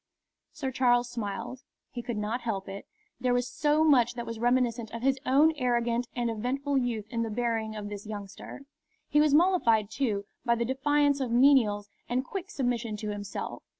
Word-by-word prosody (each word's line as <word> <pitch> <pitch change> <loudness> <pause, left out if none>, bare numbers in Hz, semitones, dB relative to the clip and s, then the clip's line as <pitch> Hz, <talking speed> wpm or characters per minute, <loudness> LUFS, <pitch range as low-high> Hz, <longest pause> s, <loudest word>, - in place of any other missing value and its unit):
Sir 285 -4 -4
Charles 245 -1 +2
smiled. 230 +3 -5 0.3
He 245 - -5
could 235 -2 -4
not 215 +4 -2
help 200 -5 -3
it. 195 +1 -8 0.3
There 250 0 +1
was 245 0 0
so 300 +1 +2
much 245 -6 +4
that 235 -1 -5
was 230 -1 -6
reminiscent 240 -1 +1
of 230 +2 -7
his 270 0 +2
own 295 +5 +5
arrogant 240 -2 0
and 240 -1 0
eventful 270 +5 -1
youth 235 -4 -2
in 230 -2 -1
the 225 - -1
bearing 225 -1 -1
of 210 -1 -5
this 205 0 -7
youngster. 205 +3 -8 0.5
He 295 - +4
was 300 -1 +4
mollified, 235 - +3
too, 215 -5 -1 0.2
by 235 -2 +2
the 235 0 -1
defiance 285 +2 +2
of 260 -3 -1
menials 230 -5 +4 0.2
and 255 +2 0
quick 390 +4 -6
submission 245 - -2
to 210 0 -4
himself. 205 -1 -5
240 Hz, 185 wpm, -28 LUFS, 220-265 Hz, 0.5 s, own